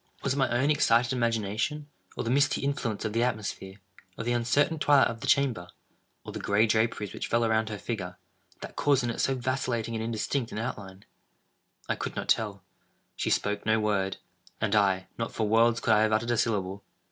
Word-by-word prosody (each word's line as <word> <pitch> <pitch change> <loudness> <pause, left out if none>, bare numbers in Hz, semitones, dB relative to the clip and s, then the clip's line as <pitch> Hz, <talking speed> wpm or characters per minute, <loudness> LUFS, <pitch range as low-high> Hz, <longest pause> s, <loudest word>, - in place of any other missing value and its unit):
Was 140 - +1
it - - -4
my 135 -3 +2
own 130 +5 +2
excited 125 -5 +3
imagination—or 115 +5 -2
the 115 - -1
misty 140 +2 +2
influence 120 -7 -2
of 110 - -2
the 115 - +1
atmosphere—or 100 -4 -5
the 120 +1 0
uncertain 140 +7 +1
twilight 145 -2 +5
of 115 -1 -7
the - - -4
chamber—or 125 -11 -2
the - - -5
gray 100 +2 +3
draperies 110 -2 0
which - - -4
fell 115 0 +2
around 110 0 +1
her 105 - -4
figure—that 95 -5 -8
caused 140 -3 +2
in 120 - 0
it - - -3
so 135 - +1
vacillating 125 -3 -2
and 110 0 -2
indistinct 115 +2 -2
an - - -6
outline? 100 -4 -6 0.8
I - - 0
could - - -5
not - - -5
tell. 100 -4 +1 0.5
She - - -2
spoke 105 0 0
no 110 0 +2
word; 100 -3 0 0.4
and 110 -1 0
I—not 100 +3 0
for 110 - -1
worlds 115 +2 +4
could 115 - +2
I 105 - +4
have 110 0 +2
uttered 115 +2 +1
a 120 - +1
syllable. 100 -4 -1
115 Hz, 185 wpm, -28 LUFS, 105-120 Hz, 0.8 s, twilight